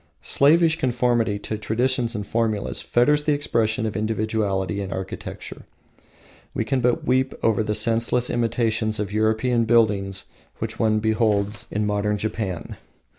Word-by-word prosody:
Slavish 160 +3 +4
conformity 120 -4 +1
to 105 +1 -5
traditions 120 +2 0
and 105 -1 -3
formulas 110 -2 -1
fetters 150 +5 +2
the 150 - +3
expression 115 -5 0
of 110 - -3
individuality 105 -2 -1
in 95 -1 -5
architecture. 95 0 -7 0.9
We - - -1
can 135 -2 0
but 125 0 +1
weep 130 +1 +1
over 110 -1 +2
the 105 0 -1
senseless 115 +2 +1
imitations 110 -2 0
of 105 -1 -3
European 110 +2 +1
buildings 105 -4 +2 0.3
which - - -5
one 110 -1 +2
beholds 105 -2 0
in 105 0 -1
modern 105 0 0
Japan. 100 -3 -4
110 Hz, 135 wpm, -23 LUFS, 105-120 Hz, 0.9 s, Slavish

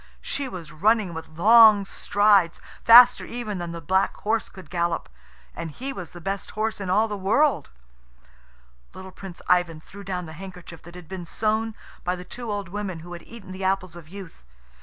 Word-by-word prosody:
She 275 -1 -4
was 170 -7 -8
running 205 +2 +2
with 160 -1 -9
long 215 +1 +7
strides, 200 -4 +2 0.2
faster 245 +2 +8
even 220 -5 -5
than 175 -1 -5
the 170 - -6
black 190 +5 +1
horse 220 +1 -1
could 180 -5 -14
gallop 170 -1 -1 0.5
and 165 - -5
he 265 - -6
was 180 -7 -7
the 175 - -11
best 195 +3 -4
horse 220 -1 -1
in 190 - -4
all 215 +4 +3
the 210 - -4
world. 205 - +1 1.3
Little 190 0 -9
Prince 185 -2 -11
Ivan 175 -3 +2
threw 200 +5 -13
down 180 -2 -4
the 160 - -10
handkerchief 180 -1 -10
that 175 +1 -14
had 180 -3 -11
been 180 -1 -7
sewn 220 +3 -1 0.3
by 180 +1 -1
the 180 0 -9
two 240 +1 -6
old 200 -3 -4
women 190 -4 -5
who 175 +2 -10
had 170 - -8
eaten 225 -5 -12
the 185 +1 -7
apples 185 -2 -1
of 165 -3 -12
youth. 190 - -11
190 Hz, 190 wpm, -24 LUFS, 175-215 Hz, 1.3 s, faster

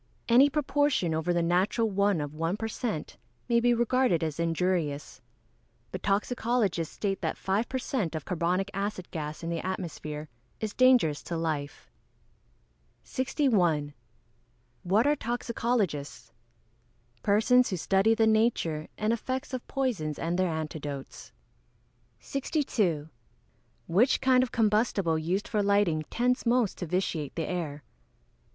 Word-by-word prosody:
_ - - -39 0.2
Any 255 +4 +6
proportion 290 - +1
over 160 +2 0
the 175 -1 +1
natural 185 +7 +2
one 200 -4 +1
of 145 0 -5
1 165 +5 -1
per 225 - -3
cent. 220 -7 -4 0.3
may 235 -1 +3
be 240 +1 +3
regarded 240 -6 +2
as 155 -1 -3
injurious. 165 -3 -1 0.7
But - - -5
toxicologists 205 -4 0
state 195 -2 -2
that - - -2
five 200 +5 -1
per 260 - -1
cent. 225 - -2
of 155 - -4
carbonic 180 +3 0
acid 195 -2 -4
gas 155 0 -5
in 165 - -3
the 165 - -3
atmosphere 155 -5 -5 0.3
is 215 -1 -3
dangerous 250 - +4
to 170 - -3
life. 155 -3 -4 1.1
61. 185 - +1 0.9
What 200 +6 +2
are 295 +1 +4
toxicologists? 220 - -2 0.9
Persons 245 +5 +4
who 185 - -2
study 195 +6 +3
the 225 - +3
nature 220 -9 +1
and 215 +2 +1
effects 260 +3 -3
of 255 - -4
poisons 220 - -1
and 170 +1 -2
their 185 -1 +2
antidotes. 150 -3 -5 0.9
62. 220 - -1 0.8
_Which 210 +10 +3
kind 260 -1 +4
of 255 - -1
combustible 210 -6 +2
used 180 +6 -1
for 210 - 0
lighting 200 -6 +2
tends 250 +2 +1
most 235 -3 +1
to 175 - -4
vitiate 160 -4 -2
the 165 - -2
air? 155 -5 -4
195 Hz, 135 wpm, -28 LUFS, 165-235 Hz, 1.1 s, Any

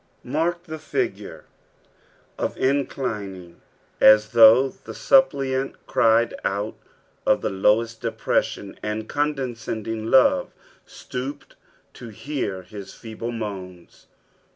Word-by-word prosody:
Hark 165 +6 -1
the 160 -2 -8
figure 155 - -4 0.9
of - - -2
inclining, 105 -10 -2 0.4
as 110 0 +6
though 115 +3 +7
the - - -12
suppliant 135 - +2
cried 115 +1 +3
out 100 +2 -2 0.5
of - - +2
the - - -2
lowest 110 +4 +1
depresdon, 110 -3 -2
and 110 +1 -4
condescending 115 -6 -3
love 130 -1 +4 0.3
stooped 135 +3 -7 0.4
to 120 - -10
hoar 110 -5 -4
his 100 +2 -10
feeble 115 +1 -6
moans. 95 -6 -8
115 Hz, 100 wpm, -23 LUFS, 105-135 Hz, 0.9 s, though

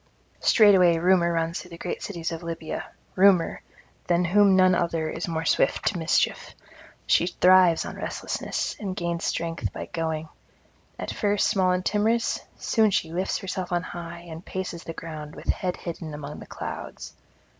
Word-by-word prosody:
Straightway 190 -6 +6
Rumour 175 0 +3
runs 165 0 -1
through 180 - -13
the 170 - -10
great 175 - -4
cities 170 -4 -4
of 165 0 -5
Libya, 165 -2 -5 0.3
Rumour, 190 -3 +4 0.5
than 175 0 +2
whom 200 +2 +5
none 185 0 +5
other 170 -2 0
is 165 - -4
more 165 -1 -2
swift - - +2
to 185 - -4
mischief; 160 - 0 0.5
she 175 - +3
thrives 180 -1 +5
on - - -7
restlessness - - -3
and 195 -3 -4
gains 170 -1 -2
strength 165 0 -2
by - - -6
going: 160 -2 -3 0.7
at - - -4
first 205 -1 +1
small 185 -2 +2
and 180 0 -1
timorous; 225 +3 +1 0.2
soon 220 -2 +2
she 165 -4 -1
lifts 185 +2 -1
herself 185 -2 -4
on 175 0 0
high 170 -1 -7
and 165 +1 -8
paces 185 -3 -5
the 165 - -5
ground 155 -2 -8
with - - -10
head 180 -1 0
hidden 165 -3 -6
among 150 0 -7
the - - -11
clouds. - - -7
175 Hz, 165 wpm, -25 LUFS, 165-185 Hz, 0.7 s, Straightway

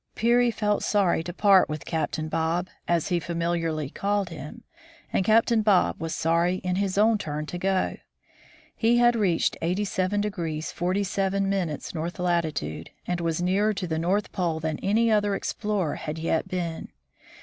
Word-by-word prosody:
Peary 240 +2 +3
felt 210 -2 0
sorry 195 -6 +2
to 175 - -5
part 195 -1 +4
with 150 0 -5
Captain 155 -1 -2
Bob, 165 +3 -1 0.2
as 170 -2 +1
he 175 - +1
famil 170 +1 -1
iarly 155 -4 -3
called 200 -1 0
him, 165 - -9 0.5
and - - +2
Captain 225 +2 +4
Bob 205 -4 +2
was 165 -1 -3
sorry 170 +2 +2
in 180 0 -1
his 195 -1 -1 0.2
turn 150 -3 -4
to 175 +3 -6
go. 190 0 0 0.8
He 235 +1 +3
had 240 0 +5
reached 190 -7 +1
8y° 185 -3 -1
47' 195 -2 0
north 170 +1 -4
latitude, 155 - -1 0.2
and 180 -1 -2
was 165 +1 -1
nearer 205 +4 +2
to 185 - -3
the 160 -2 -2
North 190 +5 0
Pole 170 -4 -1
than 155 -1 -3
any 225 +3 +2
other 205 -2 +2
explorer 200 -5 -2
had 150 +1 -5
yet 160 0 0
been. 170 -3 -3
180 Hz, 155 wpm, -26 LUFS, 165-205 Hz, 0.8 s, had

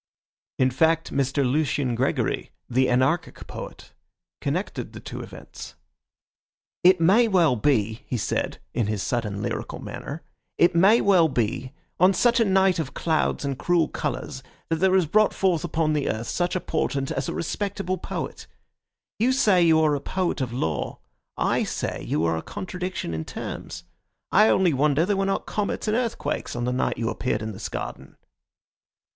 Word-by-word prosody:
In 130 0 +3
fact, 160 +5 +2
Mr. 140 0 +1
Lucian 140 -1 +1
Gregory, 130 +4 -1 0.2
the 130 +1 +2
anarchic 130 +7 0
poet, - - -9 0.5
connected - - -3
the - - -8
two - - -7
events. - - -10 1.1
"It 180 0 +6
may 200 +8 +5
well 175 - +3
be," 110 -3 +1
he 125 - -2
said, 105 - -2 0.2
in 115 -4 0
his 105 -2 -2
sudden 105 -5 -2
lyrical - - -4
manner, 150 +4 -7 0.3
"it 175 +1 +4
may 195 +7 +5
well 185 -5 +5
be 125 0 -2 0.3
on 185 +2 +5
such 240 +4 +3
a 230 - +4
night 190 -2 +3
of 150 -4 -4
clouds 160 -3 0
and 140 -1 -3
cruel 175 -2 +2
colours 130 -2 -4 0.3
that 165 - +1
there 190 +2 +3
is 185 -3 +4
brought 215 +7 +3
forth 180 -5 +1
upon 160 -2 0
the 150 -2 0
earth 110 +2 -2
such 175 0 -1
a - - +1
portent 135 -5 -2
as - - -2
a - - -3
respectable 190 +1 -2
poet. - - -5 0.7
You 240 +4 +3
say 210 -9 +4
you 165 -2 +5
are 155 -1 +3
a 140 - -1
poet 180 -3 -1
of 125 -3 -2
law; 100 - -2 0.4
I - - +1
say - - -3
you 80 +2 0
are 80 0 +1
a - - -3
contradiction 185 - -5
in 80 0 -3
terms. - - -7 0.5
I 215 +3 +6
only 185 -4 +3
wonder 145 +3 +2
there 205 +1 +1
were 195 0 +1
not 195 - -1
comets 210 +1 -2
and 215 - +2
earthquakes 235 - -2
on 120 - -2
the 125 +1 0
night 130 - 0
you 115 -1 -1
appeared 110 -3 -2
in 110 - -3
this 100 0 -6
garden." - - -7
160 Hz, 175 wpm, -25 LUFS, 130-185 Hz, 1.1 s, It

